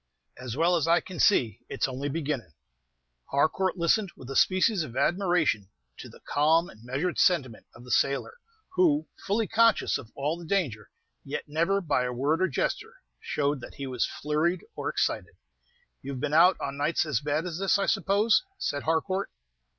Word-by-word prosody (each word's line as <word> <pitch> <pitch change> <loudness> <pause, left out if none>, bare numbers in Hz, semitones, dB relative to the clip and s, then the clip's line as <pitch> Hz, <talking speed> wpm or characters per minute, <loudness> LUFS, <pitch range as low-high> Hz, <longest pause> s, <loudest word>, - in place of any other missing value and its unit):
"As 125 0 -7
well 170 +3 +3
as 165 -2 0
I 170 +1 +5
can 185 -3 -9
see, 120 - +3
it's - - -1
only 135 +2 -4
beginnin'." 140 - -3 0.8
Harcourt 180 +7 +1
listened 180 +3 +2
with 130 +1 -9
a - - -5
species 185 +4 +3
of 130 -5 -6
admiration 175 - +1 0.3
to - - -9
the - - -15
calm 160 +4 +2
and 110 0 -17
measured 140 +9 -2
sentiment 140 - +1
of 120 - -13
the 125 - -9
sailor, 140 - +1 0.3
who, 350 -5 +2 0.2
fully 215 +3 +1
conscious 230 0 +3
of 115 - -12
all 150 +5 -2
the 170 - -9
danger, 150 - -1 0.3
yet 140 - -4
never, 170 +7 +1
by 145 -7 +1
a 125 - -2
word 145 +7 0
or 185 - +4
gesture, 135 - -2 0.2
showed 145 -2 -1
that - - -10
he 140 - -6
was 125 -3 -1
flurried 155 +5 -1
or - - -3
excited. - - -1 0.7
"You 140 +1 -6
have 130 - -6
been 150 +2 -2
out 175 +4 +6
on 140 0 -4
nights 155 +3 +1
as 145 -8 0
bad 150 +3 -1
as 175 -1 -4
this, 195 0 +3
I 200 - 0
suppose?" 210 +3 +2
said 145 - -2
Harcourt. 185 +5 -1
160 Hz, 180 wpm, -27 LUFS, 135-185 Hz, 0.8 s, out